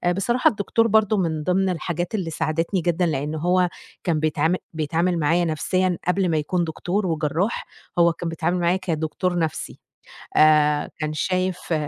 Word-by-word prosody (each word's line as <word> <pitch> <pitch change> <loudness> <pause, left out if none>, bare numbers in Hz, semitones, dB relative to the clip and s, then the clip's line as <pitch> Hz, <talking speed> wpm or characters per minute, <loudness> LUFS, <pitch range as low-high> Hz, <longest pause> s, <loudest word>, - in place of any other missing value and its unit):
بصراحة 240 +6 +2
الدكتور 225 +2 +1
برضه 215 -1 +3
من 160 -4 -1
ضمن 190 +2 +1
الحاجات 175 +3 -3
اللي 180 -6 -2
ساعدتني 165 +4 -1
جدًا، 175 +1 +1
لإن 150 -1 -2
هو 180 +3 +2 0.3
كان 165 -3 +1
بيتعامل 155 +3 +1 0.2
بيتعامل 165 +3 0
معايا 165 +4 +2
نفسيًا 180 +3 0
قبِل 185 0 +2
ما 160 - +1
يكون 175 +4 0
دكتور 180 +5 -2
وجرّاح، 165 +6 -1 0.3
هو 170 0 +5
كان 165 0 -4
بيتعامل 165 +2 -1
معايا 175 +2 +2
كدكتور 175 0 -2
نفْسي، 160 -3 -3 0.6
آآ 150 -1 +4
كان 155 0 -2
شايِف 185 +2 -1
170 Hz, 150 wpm, -23 LUFS, 155-185 Hz, 0.6 s, هو